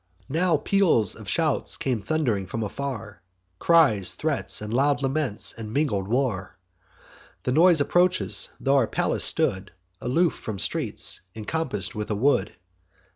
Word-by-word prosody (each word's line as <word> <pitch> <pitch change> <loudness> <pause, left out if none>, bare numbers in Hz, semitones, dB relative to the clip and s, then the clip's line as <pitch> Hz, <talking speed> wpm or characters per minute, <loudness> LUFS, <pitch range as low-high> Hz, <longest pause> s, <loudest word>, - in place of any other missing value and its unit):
"Now 165 +3 +2
peals 165 - +2
of - - -9
shouts - - 0
come 125 -5 -2
thund'ring 110 -6 -1
from 115 +5 -3
afar, 110 -5 -6 0.4
Cries, 140 - +3
threats, 155 -3 0
and 105 +1 -6
loud 140 +2 +2
laments, 135 -5 -1
and 110 -2 -8
mingled 115 -8 0
war: 115 -5 -1 0.9
The 125 - -1
noise 165 +3 +5
approaches, 180 +5 +2
tho' 140 +1 +2
our 125 -5 +3
palace - - -1
stood 95 +1 +1 0.3
Aloof 165 +8 +1
from 110 -3 -6
streets, - - -1
encompass'd 130 +4 -3
with 105 -2 -5
a 105 - 0
wood. 110 -4 +1
130 Hz, 135 wpm, -25 LUFS, 105-155 Hz, 0.9 s, noise